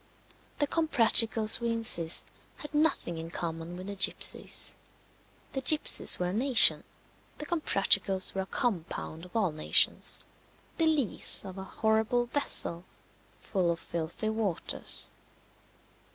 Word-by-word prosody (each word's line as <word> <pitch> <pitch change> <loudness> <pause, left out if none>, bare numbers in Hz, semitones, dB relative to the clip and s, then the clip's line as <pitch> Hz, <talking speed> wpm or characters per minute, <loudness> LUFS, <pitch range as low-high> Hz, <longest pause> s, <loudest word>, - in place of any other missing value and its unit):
The 290 - -1
Comprachicos, 230 -8 +3
we 235 -1 -4
insist, 220 -8 +1 0.3
had 295 - -10
nothing 295 - -2
in 165 0 -9
common 165 0 -7
with 185 - -10
the 200 0 -7
gipsies. 190 - -1 0.8
The 270 - -4
gipsies 305 +3 +4
were 180 0 -4
a - - -6
nation; 245 +2 +7 0.5
the 300 - -8
Comprachicos 195 - -1
were 195 - -4
a 190 - -8
compound 170 -7 -5
of 180 - -19
all 205 -7 -1
nations 155 0 0 0.6
the 330 - 0
lees 295 -9 +2
of 190 0 -10
a - - -8
horrible 220 +5 -2
vessel 235 -10 +1 0.5
full 185 -4 -4
of 170 0 -3
filthy 170 +7 -6
waters. 220 -6 -1
210 Hz, 125 wpm, -27 LUFS, 175-245 Hz, 0.8 s, nation